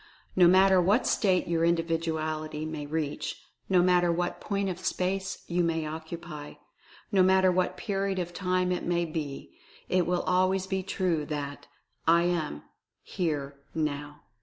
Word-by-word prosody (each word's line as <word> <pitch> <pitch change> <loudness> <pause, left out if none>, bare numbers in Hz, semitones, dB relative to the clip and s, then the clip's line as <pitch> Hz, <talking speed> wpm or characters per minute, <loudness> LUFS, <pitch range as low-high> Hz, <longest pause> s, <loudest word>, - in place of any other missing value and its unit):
No 180 -2 +7
matter 190 +1 +6
what 205 +8 +3
state 185 -4 +2
your 165 -1 +1
Individuality 160 -2 -1
may 155 -2 -5
reach; 150 -1 -3 0.3
no 180 -2 +5
matter 175 -1 +4
what 175 +1 -2
point 200 -1 -1
of 180 -2 -3
space 190 +1 -2
you 175 0 0
may 165 -1 0
occupy; 155 -1 -7 0.6
no 195 -3 +4
matter 190 0 +5
what 180 0 0
period 195 0 -1
of 175 -1 -3
time 185 -1 0
it 180 - -1
may 175 0 +1
be 155 -4 -6
— - - -25
it 180 -2 +2
will 180 0 +1
always 185 +1 +2
be 190 0 -1
true 180 -4 -1
that 145 -2 -5 0.4
"I 170 +1 +5
AM, 165 - -1 0.4
HERE, 145 -5 -3 0.2
NOW 150 -1 -3
175 Hz, 155 wpm, -28 LUFS, 155-185 Hz, 0.6 s, No